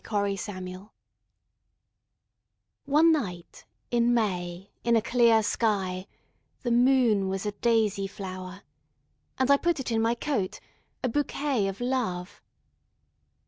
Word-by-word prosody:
My 200 -1 +1
Flower 185 0 -7 2.0
ONE 305 +4 +5
night 180 - -3 0.3
in 240 0 +3
May 180 -4 -2
in 235 0 +3
a 225 - +4
clear 235 -2 +4
skyThe 205 +2 -3
moon 240 -6 +3
was 195 +1 -3
a 210 - -1
daisy 210 -2 +1
flower:And! 190 +6 -8
put 340 -3 +1
it 255 - -3
in 225 -1 +1
my 230 +1 +2
coat,A 245 -1 -4
bouquet 280 -3 0
of 195 0 -5
Love! 235 -8 -2
215 Hz, 100 wpm, -27 LUFS, 190-245 Hz, 2.0 s, ONE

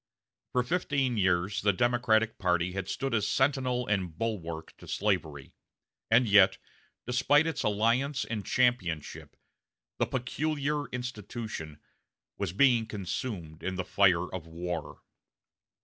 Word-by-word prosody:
For 125 - +2
fifteen 140 -4 0
years 95 +1 +1
the 100 - +4
Democratic 115 0 +2
party 90 -2 +1
had 95 0 -4
stood 135 -2 -2
as 110 -3 +1
sentinel 130 -2 +1
and 95 -6 -1
bulwark 85 -8 -4
to - - -14
slavery, 85 -9 -2 0.6
and 115 +2 +5
yet, 100 -2 +6 0.5
despite 130 +5 +3
its 165 - -2
alliance 120 +6 +1
and 110 -3 -4
championship, 95 - 0 0.6
the - - +2
"peculiar 145 +3 -2
institution" 110 -9 -6 0.6
was 100 -4 -3
being 115 +2 +4
consumed 95 - -5
in 95 - -3
the 95 -1 -3
fire 90 -3 +3
of 85 -3 -6
war. 85 -1 -5
105 Hz, 120 wpm, -29 LUFS, 90-125 Hz, 0.6 s, yet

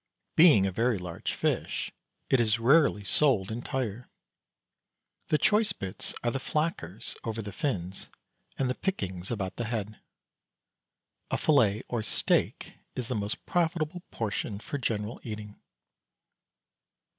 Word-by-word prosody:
Being 155 - +7
a 95 - 0
very 115 +3 +2
large 90 -2 -4
fish, - - -1 0.4
it 130 - +5
is 115 -2 +3
rarely 130 -2 +4
sold 105 -2 +3
entire. 120 -1 -3 1.2
The 155 - +3
choice 210 +7 +3
bits 95 -1 -5
are 120 - +2
the 135 - -2
flackers 150 - -2
over 115 -1 -3
the 105 -2 -4
fins 95 - -3 0.5
and 135 - +1
the 125 - +1
pickings 95 - -3
about 100 -5 -3
the 120 - -1
head. 110 -2 -3 1.3
A - - +1
fillet 115 -8 +3
or 120 -2 -1
"steak" 105 - +1 0.2
is 125 -1 -4
the 125 - 0
most 105 0 -3
profitable 170 0 0
portion 105 -2 -2
for 140 +6 -4
general 110 -2 -2
eating. 105 -2 -7
115 Hz, 130 wpm, -29 LUFS, 100-140 Hz, 1.3 s, Being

